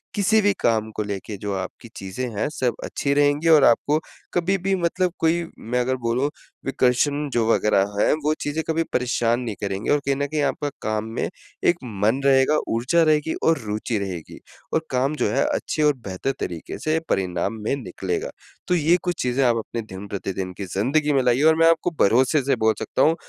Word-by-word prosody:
किसी 210 +2 +3
भी 205 0 +3
काम 110 -2 +1
को 105 - -1
लेके 100 +1 -5
जो 100 0 -4
आप 95 -1 -3
की 115 - -11
चीज़ें 95 +7 -4
हैं 105 - 0
सब 125 -5 0
अच्छी 140 - -1
रहेंगी, 145 +2 +2
और 155 -3 +7
आपको 145 +6 +3 0.3
कभी 180 +3 +1
भी 195 +2 0
मतलब 180 0 0
कोई 165 +1 +2
मैं 125 +2 -2
अगर 130 +1 0
बोलूँ 125 +4 0 0.4
विकर्षण 135 +3 +1
जो 115 -2 +2
वगैरह 100 -2 +2
है - - +4
वो 155 - +3
चीज़ें 150 +2 -2
कभी 165 +1 +1
परेशान 120 -1 +1
नहीं 115 -4 -4
करेंगे। 100 +1 -2
और 145 - +4
कहीं 140 0 +1
न 140 - 0
कहीं 150 +1 -1
आपका 145 0 -1
काम 110 0 -1
में - - -1 0.4
एक 175 - +5 0.2
मन 110 +6 +1
रहेगा, 135 +2 +4
ऊर्जा 125 +9 +2
रहेगी 155 0 +2
और 165 -1 +4
रुचि 105 +2 -2
रहेगी। 90 -5 -6 0.3
और 160 0 +1
काम 135 +3 +1
जो - - 0
है 135 - +2
अच्छे 155 - -1
और 150 - +5
बेहतर 95 +8 -2
तरीके 85 -2 -5
से 155 +1 0
परिणाम 90 +1 0
में 110 - 0
निकलेगा। 425 - -4 0.4
तो 180 - +2
ये 170 +2 +3
कुछ 180 -1 -2
चीज़ें 125 +2 +1
आप 120 -1 +3
अपने 115 +1 -4
दिन-प्रतिदिन 95 -1 -5
की 100 - -4
ज़िंदगी 145 +8 +2
में 135 -2 +3
लाइए। 125 +3 +2
और - - -2
मैं 165 0 +6
आपको 165 +1 +2
भरोसे 130 +8 +4
से 140 - +2
बोल 110 - +5
सकता - - -2
हूँ, 160 +2 +4
135 Hz, 200 wpm, -23 LUFS, 110-155 Hz, 0.4 s, और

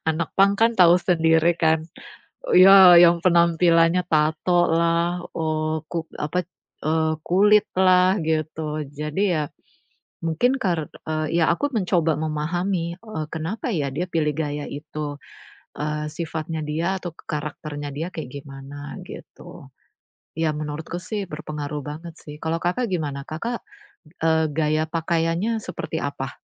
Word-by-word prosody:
Anak 160 +1 -1
punk 200 0 +4
kan 230 +1 +5
tahu 175 -1 +7
sendiri 165 -1 +3
kan. 160 -1 +2 0.7
Ya 190 -1 +9
yang 170 0 +6
penampilannya 170 0 +4
tato 160 +3 +2
lah, 170 +1 +1
eee, 155 -1 -1
kuk 165 -1 -4
apa, 175 +5 -1 0.4
eee 160 0 +1
kulit 205 +3 +4
lah, 185 0 +5
gitu. 155 -1 -2
Jadi 150 +5 -4
ya, 155 - 0 0.8
mungkin 245 +12 +1
kar 175 - -1 0.4
ya, 165 -1 +2
aku 290 +12 -1
mencoba 170 -5 +1
memahami 170 +3 -2 0.3
kenapa 165 +10 -4
ya 145 -7 -1
dia 175 +5 -2
pilih 150 -2 +1
gaya 145 -2 -3
itu, 145 0 -6 0.6
eee, 150 +1 -2
sifatnya 160 0 -4
dia 165 +5 -1
atau 175 - -5
karakternya 150 -1 -6
dia 160 +4 -3
kayak 155 -6 -6
gimana, 140 +1 -9
gitu. - - -12 0.7
Ya 160 -1 +2
menurutku 155 +3 -5
sih 205 +2 -4
berpengaruh 150 -1 -5
banget, 160 +3 -7
sih. 150 0 -9
Kalau 165 +1 -1
Kakak 185 +8 0
gimana? 145 -5 -2
Kakak, 230 +10 -4 0.6
eee, 160 0 +3
gaya 155 +1 +1
pakaiannya 165 +6 0
seperti - - -5
apa? - - -5
160 Hz, 125 wpm, -23 LUFS, 155-175 Hz, 0.8 s, Ya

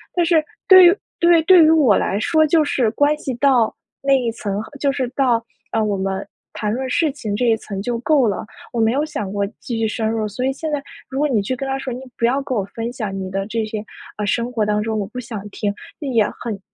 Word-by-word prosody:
但 345 - +2
是 325 -2 +3 0.2
对 375 -2 +10
于 360 - +4 0.2
对， 340 -1 +5
对 360 -1 +7
于 310 - +6
我 295 -10 +5
来 200 - 0
说 315 +5 +3
就 310 0 +3
是 245 -5 +1
关 290 +5 +2
系 265 - -4
到 245 -3 +3 0.3
那 275 0 +3
一 235 -2 -1
层 205 -3 -4 0.2
就 280 0 +2
是 270 -2 -2
到， 240 -4 +2 0.3
呃， 225 - 0
我 210 -1 0
们 190 0 -3 0.3
谈 210 -1 -2
论 260 +2 -3
事 305 +4 +1
情 220 -7 -4
这 245 - 0
一 230 -2 +4
层 200 -3 -7
就 235 +3 -2
够 270 0 +3
了， 200 - -2 0.3
我 235 - 0
没 225 - +3
有 285 +5 0
想 280 -11 -4
过 200 0 0
继 235 - -4
续 225 -1 +1
深 220 0 -1
入。 220 -1 -1
所 210 +5 -5
以 265 - +2
现 305 +3 -5
在 290 -2 -1 0.3
如 270 - -3
果 300 - +3
你 220 -6 +1
去 255 - -2
跟 270 +2 -4
他 270 - -1
说 265 -2 -4
你 250 - -7 0.2
不 235 - +1
要 260 +4 +2
跟 265 -3 -3
我 195 - -1
分 230 +1 -3
享 215 -6 -4
你 190 -1 -4
的 195 +1 -2
这 225 +2 -2
些， 215 -1 -5 0.3
呃， 210 - -2
生 235 +4 0
活 220 -4 0
当 210 0 +1
中 220 0 -2
我 200 - -2
不 220 +5 -7
想 225 -5 -7
听， 205 0 -2 0.3
那 290 - -5
也 235 -5 +3 0.2
很 215 -4 -4
240 Hz, 275 characters per minute, -20 LUFS, 215-280 Hz, 0.3 s, 对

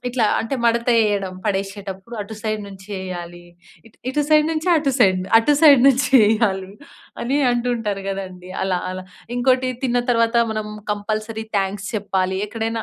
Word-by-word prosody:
ఇట్లా 245 -2 0 0.2
అంటే 225 +4 -3
మడత 235 +1 +2
వేయడం 205 -4 +1
పడేసేటప్పుడు 195 +2 -4
అటు 210 +2 -7
సైడ్ 215 -1 -2
నుంచి 195 -1 -12
వేయాలి, 175 -2 -7 0.4
ఇ - - -14 0.2
ఇటు 295 +3 0
సైడ్ 305 0 +5
నుంచి 320 +3 -2
అటు 295 -3 +1
సైడ్, 190 -5 +4 0.2
అటు 290 +6 +2
సైడ్ 285 -5 +8
నుంచేయాలి 220 -7 +3 0.5
అని 265 +4 0
అంటుంటారు 235 -5 -1
గదండీ 185 -2 -6
అలా, 185 -2 0
అలా. 185 0 -6 0.3
ఇంకోటి 255 +1 +2
తిన్న 245 -1 +1
తరువాత 230 0 +2 0.2
మనం 215 -1 -4 0.2
కంపల్సరీ 215 +2 -4
థాంక్స్ 195 0 -3
చెప్పాని. 190 -2 -1
ఎక్కడైనా 225 0 -3
215 Hz, 145 wpm, -21 LUFS, 195-240 Hz, 0.5 s, సైడ్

